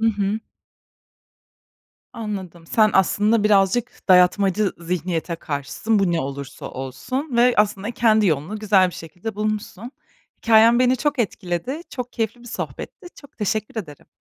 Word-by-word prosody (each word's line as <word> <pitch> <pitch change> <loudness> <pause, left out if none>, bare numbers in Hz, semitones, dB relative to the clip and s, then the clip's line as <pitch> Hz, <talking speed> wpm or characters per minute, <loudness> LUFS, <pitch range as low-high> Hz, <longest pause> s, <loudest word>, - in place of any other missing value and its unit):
Hı 225 - +2
hı. 210 -1 0 1.7
Anladım. 190 -7 -6
Sen 215 +4 +3
aslında, 210 +3 +3
birazcık 205 +3 +1
dayatmacı 190 +2 +4
zihniyete 170 0 -3
karşısın, 155 +9 -2
bu 185 -3 +2
ne 165 - +1
olursa 140 -1 -6
olsun 235 - -4
ve 245 +1 +5
aslında 210 0 +1
kendi 220 -3 +3
yolunu 160 +6 -1
güzel 195 -3 +4
bir 180 - -9
şekilde 180 +6 -7
bulmuşsun. 215 +2 -4 0.5
Hikâyen 230 +1 +5
beni 255 0 +3
çok 295 +1 -1
etkiledi, 205 - -2
çok 250 -2 -6
keyifli 225 +1 -3
bir 240 - -12
sohbetti, 360 - -7
çok 285 - -17
teşekkür 215 +2 -2
ederim. 150 -5 -15
210 Hz, 135 wpm, -22 LUFS, 180-230 Hz, 1.7 s, ve